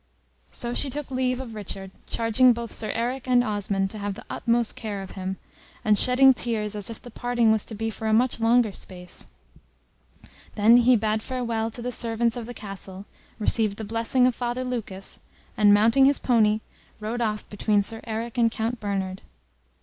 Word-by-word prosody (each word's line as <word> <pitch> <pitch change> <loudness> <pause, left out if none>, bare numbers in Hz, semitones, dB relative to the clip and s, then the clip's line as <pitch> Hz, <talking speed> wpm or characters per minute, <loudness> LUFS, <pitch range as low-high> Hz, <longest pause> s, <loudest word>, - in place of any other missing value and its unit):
So 240 0 -4
she 275 - 0
took 290 +1 -6
leave 255 -1 0
of 250 -4 -7
Richard, 195 -2 -6 0.2
charging 235 +2 +4
both 235 0 -6
Sir 215 - -2
Eric 245 +3 -2
and 245 -1 +4
Osmond 200 -3 -1
to 215 - -7
have 200 -1 -3
the 230 - -11
utmost 235 -1 0
care 205 -3 -5
of 190 - -10
him, 190 0 -5 0.5
and 215 -1 +5
shedding 255 +5 +6
tears 220 -4 -1
as 205 0 -2
if 225 - -7
the 245 - -12
parting 240 -1 +1
was 220 -1 +3
to 220 - -6
be 225 +1 -2
for 220 +1 -5
a - - +1
much 240 +2 +2
longer 230 -1 +3
space; 180 -2 -7 1.3
then 225 +3 +6
he 245 +1 +5
bade 215 0 0
farewell 230 -3 -2
to 235 +1 -7
the 250 - -2
servants 230 0 0
of 235 -2 -6
the 245 - -8
castle, 195 -1 -7 0.3
received 215 -1 +2
the 220 - -5
blessing 230 +4 +1
of 255 - +3
Father 245 +1 -3
Lucas, 220 -6 -4 0.4
and 210 -1 +5
mounting 225 +6 +5
his 280 +1 +4
pony, 220 -3 +2 0.4
rode 220 +3 -3
off 215 -2 -2
between 205 0 +1
Sir 225 +2 -3
Eric 230 +2 -4
and 230 -1 +4
Count 225 +2 -3
Bernard. 195 -2 -3
225 Hz, 190 wpm, -25 LUFS, 210-245 Hz, 1.3 s, shedding